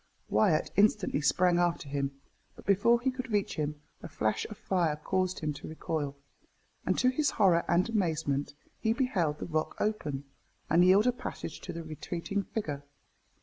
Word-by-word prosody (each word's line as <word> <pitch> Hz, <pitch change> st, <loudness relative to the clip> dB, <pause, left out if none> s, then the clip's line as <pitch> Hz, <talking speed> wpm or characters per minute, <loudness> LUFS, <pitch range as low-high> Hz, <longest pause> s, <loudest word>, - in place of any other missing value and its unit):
Wyat 130 Hz, +9 st, +3 dB
instantly 200 Hz, -6 st, +3 dB
sprang 175 Hz, +4 st, +3 dB
after 175 Hz, -4 st, 0 dB
him, 140 Hz, -1 st, -3 dB, 0.4 s
but -, -, -14 dB
before 205 Hz, +5 st, +4 dB
he 260 Hz, +2 st, 0 dB
could 255 Hz, -2 st, -6 dB
reach 205 Hz, -2 st, 0 dB
him 150 Hz, -1 st, -2 dB, 0.2 s
a -, -, -6 dB
flash 110 Hz, 0 st, -1 dB
of 215 Hz, -, -8 dB
fire 170 Hz, -5 st, +1 dB
caused 185 Hz, +4 st, -1 dB
him 155 Hz, -1 st, -1 dB
to 140 Hz, -, -9 dB
recoil, 155 Hz, -3 st, -3 dB, 0.7 s
and -, -, +2 dB
to 255 Hz, -, +4 dB
his 280 Hz, +3 st, +1 dB
horror 185 Hz, -8 st, +4 dB
and 175 Hz, +2 st, +3 dB
amazement, 160 Hz, -10 st, -1 dB, 0.2 s
he 220 Hz, 0 st, +2 dB
beheld 195 Hz, -, 0 dB
the -, -, -5 dB
rock 155 Hz, -2 st, -1 dB
open, 150 Hz, -11 st, -1 dB, 0.5 s
and 170 Hz, +2 st, +6 dB
yield 190 Hz, +4 st, +6 dB
a 250 Hz, -, +5 dB
passage 200 Hz, -8 st, -6 dB
to 180 Hz, -, -6 dB
the 165 Hz, -1 st, -6 dB
retreating 170 Hz, +5 st, -3 dB
figure. 155 Hz, -9 st, -4 dB
175 Hz, 170 wpm, -30 LUFS, 150-210 Hz, 0.7 s, and